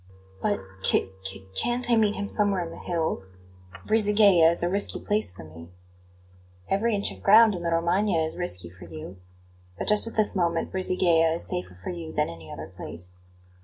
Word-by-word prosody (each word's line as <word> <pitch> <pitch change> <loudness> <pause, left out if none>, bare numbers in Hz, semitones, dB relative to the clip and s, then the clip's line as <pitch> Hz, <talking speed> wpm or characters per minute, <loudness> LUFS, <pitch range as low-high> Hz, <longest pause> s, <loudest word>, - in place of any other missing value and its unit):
"BUT - - 0 0.2
c 95 - +1
c 95 0 -7
can't 240 - 0
I - - +5
meet 215 -2 +2
him 200 - -4
somewhere 200 -3 +1
in 165 - -8
the - - -10
hills? 160 - -2 0.5
Brisighella 205 -6 +4
is 170 +1 -1
a - - +2
risky 200 +3 0
place 210 - 0
for 90 -2 -12
me." 80 +2 -12 1.0
"Every 220 +3 +1
inch 200 - 0
of - - -12
ground 220 +2 +6
in 180 - -5
the 170 - -2
Romagna 170 +4 +1
is 160 - -3
risky 90 - -1
for 95 0 -13
you; 85 +3 -9 0.6
but - - -5
just 210 +1 +4
at 230 - -8
this 215 -2 +4
moment 170 -2 0
Brisighella 175 -3 +2
is 170 - +3
safer 90 0 -1
for - - -4
you 170 -2 -7
than 150 - -1
any 80 -1 -12
other - - -7
place." 90 +2 -7
170 Hz, 190 wpm, -26 LUFS, -, 1.0 s, ground